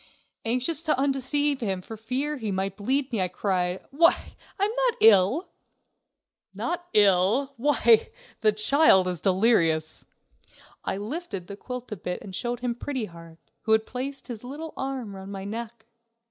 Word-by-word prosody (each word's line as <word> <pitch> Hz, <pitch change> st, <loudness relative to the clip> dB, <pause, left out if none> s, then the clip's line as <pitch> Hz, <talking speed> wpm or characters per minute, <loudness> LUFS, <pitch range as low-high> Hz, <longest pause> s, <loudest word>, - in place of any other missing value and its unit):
Anxious 255 Hz, +7 st, 0 dB
to 315 Hz, -5 st, +1 dB
undeceive 280 Hz, +1 st, +1 dB
him 190 Hz, -4 st, -2 dB
for 225 Hz, -, -8 dB
fear 255 Hz, +7 st, -2 dB
he 220 Hz, -5 st, -3 dB
might 190 Hz, 0 st, -2 dB
bleed 260 Hz, +7 st, -1 dB
me, 215 Hz, -, +1 dB
I 185 Hz, -, +2 dB
cried: 180 Hz, -1 st, -1 dB
"Why, 335 Hz, +5 st, +3 dB, 0.3 s
I'm 405 Hz, +2 st, +2 dB, 0.2 s
not 475 Hz, -, +1 dB
ill!" 220 Hz, -, +5 dB, 1.1 s
"Not 350 Hz, 0 st, -3 dB
ill! 205 Hz, +7 st, +4 dB
Why, 235 Hz, -3 st, +4 dB, 0.3 s
the 215 Hz, -1 st, +4 dB
child 215 Hz, -3 st, +4 dB
is 180 Hz, -3 st, -3 dB
delirious." 180 Hz, -6 st, +2 dB, 0.8 s
I -, -, -2 dB
lifted 215 Hz, -, -5 dB
the 200 Hz, -, -8 dB
quilt 250 Hz, +3 st, -7 dB
a -, -, -2 dB
bit 180 Hz, -1 st, -5 dB
and 195 Hz, -, -9 dB
showed 240 Hz, +2 st, -3 dB
him 245 Hz, -1 st, -1 dB
Pretty 255 Hz, 0 st, -4 dB
Heart, 165 Hz, -3 st, -13 dB, 0.2 s
who 220 Hz, -, +2 dB
had 220 Hz, 0 st, +3 dB
placed 270 Hz, +2 st, -5 dB
his 235 Hz, -3 st, -7 dB
little 300 Hz, +5 st, -7 dB
arm 260 Hz, -7 st, -4 dB
round 190 Hz, +1 st, -9 dB
my 195 Hz, -1 st, -6 dB
neck. 225 Hz, +2 st, -6 dB
225 Hz, 160 wpm, -26 LUFS, 195-275 Hz, 1.1 s, ill